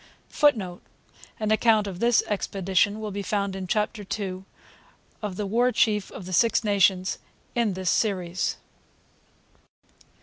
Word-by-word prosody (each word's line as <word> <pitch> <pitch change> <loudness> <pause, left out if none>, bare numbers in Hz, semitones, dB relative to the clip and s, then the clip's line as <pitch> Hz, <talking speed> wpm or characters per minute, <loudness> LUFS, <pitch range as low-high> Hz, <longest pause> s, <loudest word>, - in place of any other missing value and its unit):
[Footnote: 210 -12 +1 0.6
An 215 -1 -1
account 220 -1 +4
of 190 -3 -6
this 235 +1 +3
expedition 195 0 0
will 215 -1 -4
be 200 +1 -4
found 200 -1 -1
in 190 -1 -5
Chapter 210 +2 -1 0.2
ii 185 -2 -4 0.8
of 205 -4 -4
'The 210 - -3
War 240 +5 +2
Chief 215 -3 +1
of 190 - -9
the 185 - -6
Six 225 +6 +3
Nations' 195 -3 +2 0.3
in 230 -4 +1
this 185 -1 -1
Series. 185 -4 0
205 Hz, 135 wpm, -25 LUFS, 185-215 Hz, 0.8 s, account